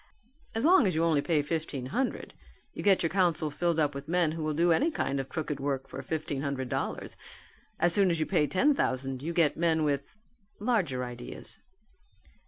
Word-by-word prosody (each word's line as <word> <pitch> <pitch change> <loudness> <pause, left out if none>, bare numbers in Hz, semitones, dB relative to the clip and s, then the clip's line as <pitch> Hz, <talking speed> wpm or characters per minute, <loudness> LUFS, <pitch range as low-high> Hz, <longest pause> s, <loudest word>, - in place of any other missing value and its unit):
As 225 +5 0
long 330 - +6
as 180 - 0
you 160 - +2
only 160 -4 +3
pay 155 -2 +1
fifteen 150 -4 -3
hundred 260 0 -2 0.4
you - - -6
get 195 -3 +4
your 165 - +2
council 170 -5 +1
filled 170 +2 0
up 145 -2 +2
with 140 +1 -7
men 170 -1 +2
who 160 +1 -5
will 155 -1 -1
do 170 +2 +3
any 290 - +3
kind 135 - -1
of 135 0 -4
crooked 150 -3 -3
work 135 -1 -2
for 135 - -7
fifteen 145 0 -3
hundred 140 -3 -3
dollars; - - -3 0.6
as 175 +1 +3
soon 195 -1 +4
as 165 -2 0
you 155 - +1
pay 150 - +2
ten 265 - +3
thousand 130 - -1
you 160 +4 -3
get 165 -4 +2
men 160 -1 +2
with 140 +1 -1 0.4
larger 200 - 0
ideas." 125 0 -7
155 Hz, 195 wpm, -29 LUFS, 140-175 Hz, 0.6 s, long